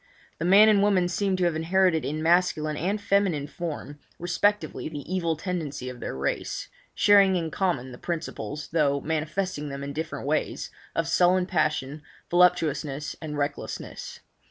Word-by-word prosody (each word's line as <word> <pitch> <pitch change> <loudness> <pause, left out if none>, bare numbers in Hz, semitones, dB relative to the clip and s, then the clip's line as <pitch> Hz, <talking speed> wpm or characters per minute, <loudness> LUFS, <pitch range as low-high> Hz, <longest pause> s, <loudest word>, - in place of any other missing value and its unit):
The 160 - -1
man 200 +4 +7
and 210 -2 +5
woman 195 -3 +3
seemed 190 +1 0
to 185 - 0
have 170 -2 +2
inherited 170 0 +2
in 155 +2 -3
masculine 165 -3 +2
and 190 +8 -1
feminine 195 -7 +1
form 150 -2 -6 0.2
respectively 180 +2 0
the 145 -3 -6
evil 170 -2 0
tendency 155 -7 -4
of 125 -1 -9
their - - -5
race, 70 +1 -3 0.3
sharing 200 -2 +5
in 165 -3 -2
common 150 -10 -1
the 125 - -11
principles, 150 -5 -5
though 145 -3 +2
manifesting 155 +1 -2
them 140 0 -6
in 140 0 -5
different 155 -2 -4
ways, 155 +2 -1 0.2
of 165 0 0
sullen 180 +2 +3
passion, 155 -4 -1 0.3
voluptuousness 155 -5 +2
and 150 -2 -5
recklessness. 145 0 -5
160 Hz, 155 wpm, -26 LUFS, 150-185 Hz, 0.3 s, man